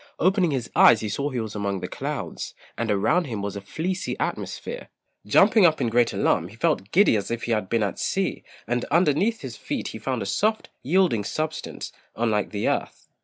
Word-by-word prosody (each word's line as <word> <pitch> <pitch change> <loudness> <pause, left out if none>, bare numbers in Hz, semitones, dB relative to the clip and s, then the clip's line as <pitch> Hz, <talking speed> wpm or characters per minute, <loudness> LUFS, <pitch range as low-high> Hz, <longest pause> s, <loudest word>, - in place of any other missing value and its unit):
Opening 185 0 +3
his 130 -5 -2
eyes 115 - +7
he 110 - -3
saw 140 +8 -1
he 130 -3 -3
was 110 -2 -4
among 100 -2 -2
the - - -4
clouds, - - -5 0.2
and 115 0 -2
around 105 - +2
him 110 -7 -4
was 100 0 -3
a 100 - -5
fleecy 180 - -3
atmosphere. - - -4 0.4
Jumping 220 - +5
up 160 -3 +5
in 120 -4 +1
great 120 0 +3
alarm, 80 - +1
he 100 - -14
felt 115 - 0
giddy 200 - +5
as 100 - -2
if 115 0 -3
he 120 - -2
had 105 -4 0
been 115 -2 +1
at 100 - -3
sea, - - -1 0.2
and 120 +2 -1
underneath 175 +7 +2
his - - -7
feet - - -4
he - - -7
found - - -2
a - - -5
soft, 220 +1 0
yielding 165 - +2
substance, 155 +8 -4 0.2
unlike 110 -3 0
the 105 -1 -2
earth. - - -2
120 Hz, 205 wpm, -25 LUFS, 105-170 Hz, 0.4 s, eyes